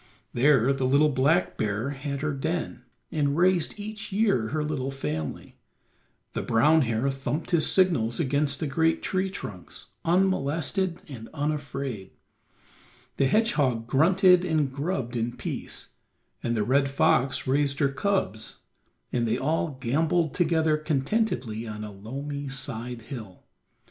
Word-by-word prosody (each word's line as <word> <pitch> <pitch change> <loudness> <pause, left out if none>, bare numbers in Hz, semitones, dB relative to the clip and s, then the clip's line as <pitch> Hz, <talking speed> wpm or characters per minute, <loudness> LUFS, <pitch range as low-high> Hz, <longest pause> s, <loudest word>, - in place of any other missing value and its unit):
There 135 0 +4
the 135 -1 0
little 145 +3 +4
black 145 +7 +2
bear 110 +6 -1
had 140 0 -4
her 155 0 -1
den 160 +4 -3 0.3
and 145 -3 0
raised 180 +2 +2
each 210 +1 -6
year 195 - +2
her 155 +5 -1
little 145 -3 -2
family, 80 - -5 0.8
the - - -2
brown 150 +8 +4
hare 115 0 0
thumped 140 +4 -3
his 170 -3 +3
signals 140 -12 +2
against 140 +1 +1
the - - -1
great 160 +3 +1
tree 190 0 0
trunks 100 - -9
unmolested 175 0 +1
and 115 -6 -9
unafraid, 140 -8 -3 1.1
the 135 - +3
hedgehog 140 - +2
grunted 180 - +5
and 155 -6 0
grubbed 140 -5 -2
in 120 +1 -2
peace, - - -5 0.5
and 120 - -1
the 105 - +2
red 135 +5 +2
fox 135 -1 +2
raised 140 +1 +1
her 140 -1 +2
cubs 135 - -1 0.6
and 120 -1 +1
they 115 +2 +1
all 150 0 -1
gamboled 160 +5 +1
together 160 -3 +2
contentedly 145 - -1
on 105 0 -6
a 105 - -6
loamy 140 +8 -6
side 125 -3 -5
hill. 110 -8 -9
140 Hz, 135 wpm, -26 LUFS, 125-160 Hz, 1.1 s, grunted